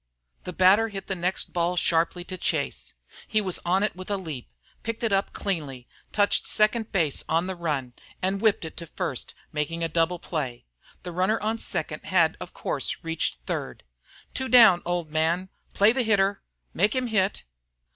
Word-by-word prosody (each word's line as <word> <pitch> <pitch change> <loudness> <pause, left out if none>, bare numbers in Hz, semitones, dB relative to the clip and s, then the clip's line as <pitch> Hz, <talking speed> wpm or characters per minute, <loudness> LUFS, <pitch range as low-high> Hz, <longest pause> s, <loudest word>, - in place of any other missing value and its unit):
The 180 - -4
batter 195 +6 +5
hit 195 -2 -6
the - - -2
next 180 +1 -1
ball 175 +1 0
sharply 170 +1 +1
to 185 - -6
Chase. - - -2 0.3
He 215 - +2
was 190 -4 -3
on 185 +3 +2
it 210 - 0
with 185 +2 -8
a 200 - +1
leap, 155 - -6 0.3
picked 230 +1 -4
it 225 -3 +2
up 195 0 +1
cleanly, 145 -10 -4 0.2
touched 205 -1 +2
second 215 +1 +2
base 165 -8 +1
on 165 +2 +2
the 190 0 -3
run, 145 -8 -2 0.3
and 190 +2 -1
whipped 215 -6 +2
it 160 - -8
to 170 - -5
first, 130 -4 -4 0.2
making 155 +3 -2
a - - +2
double 165 +2 +1
play. 140 -8 -4 0.4
The 180 - -5
runner 185 +6 +1
on 220 +2 -1
second - - -1
had - - +3
of - - -7
course - - -2
reached 165 - -2
third. - - -4 0.5
"Two 265 0 -2
down, 225 -8 +8
old 175 -3 -2
man!" 165 +4 +1 0.3
"Play 205 +2 +6
the 260 +2 +1
hitter!" 200 -3 +2 0.3
"Make 205 +7 +2
him 255 -1 +1
hit!" 205 -4 0
185 Hz, 180 wpm, -26 LUFS, 165-205 Hz, 0.5 s, down